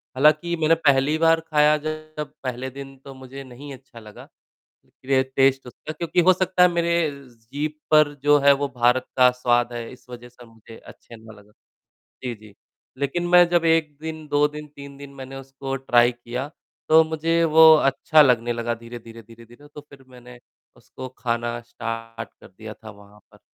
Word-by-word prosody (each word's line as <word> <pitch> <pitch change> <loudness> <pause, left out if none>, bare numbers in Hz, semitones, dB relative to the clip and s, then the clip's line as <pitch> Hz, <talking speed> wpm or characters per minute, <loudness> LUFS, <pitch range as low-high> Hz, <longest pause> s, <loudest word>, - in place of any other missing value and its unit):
हालाँकि 155 +5 +2
मैंने 160 +1 +4
पहली 145 -1 +2
बार 165 0 +3
ख़ाया 150 -1 +2
जब 155 -1 -6
पहले 130 0 -5
दिन 135 +1 -11
तो 135 - -10
मुझे 130 +1 -11
नहीं 135 +2 -11
अच्छा 130 -3 -15
लगा, 105 -1 -14 0.8
ये 130 0 +2
टेस्ट 135 -1 +2
उसका 140 +5 -9
क्योंकि 170 +2 -1
हो - - +8
सकता 185 0 0
है 180 - +7
मेरे 170 0 0 0.3
जीभ 130 +6 -6 0.2
पर 155 -1 +4
जो 145 0 +5
है 140 0 +6
वो 140 - -1
भारत 125 +1 +2
का 125 -1 +6
स्वाद 120 -1 0
है 120 -1 -7
इस 125 - -17
वजह 120 0 -10
से 125 0 -17
मुझे 115 0 -16
अच्छा 115 - -15
नहीं 110 -1 -15
लगा। 105 +1 -21 0.7
जी, 125 - -3
जी, 105 -1 -17 0.4
लेक़िन 175 +6 -2
मैं 175 0 +6
जब 175 -1 +1
1 160 -3 +1
दिन, 160 -1 -7
2 145 0 +2
दिन, 150 0 -10
3 140 -1 -13
दिन 140 0 -12
मैंने 135 0 -10
उसको 135 0 -7
ट्राई 120 -2 +3
किया, 120 +2 -6 0.4
तो 160 +1 +7
मुझे 160 +1 -1
वो 160 0 +7
अच्छा 150 +2 +3
लगने 120 -4 +2
लगा 120 0 -3
धीरे-धीरे 115 0 -12
धीरे-धीरे 115 +5 -17
तो 150 - -9
फ़िर 140 -2 -18
मैंने 125 -1 -15 0.4
उसको 130 - -11
ख़ाना 120 0 -3
स्टार्ट 115 -1 -7
कर - - -14
दिया 110 +3 -11
था 110 - -10
वहाँ 100 0 -19
पर। - - -20
135 Hz, 180 wpm, -22 LUFS, 120-155 Hz, 0.8 s, हो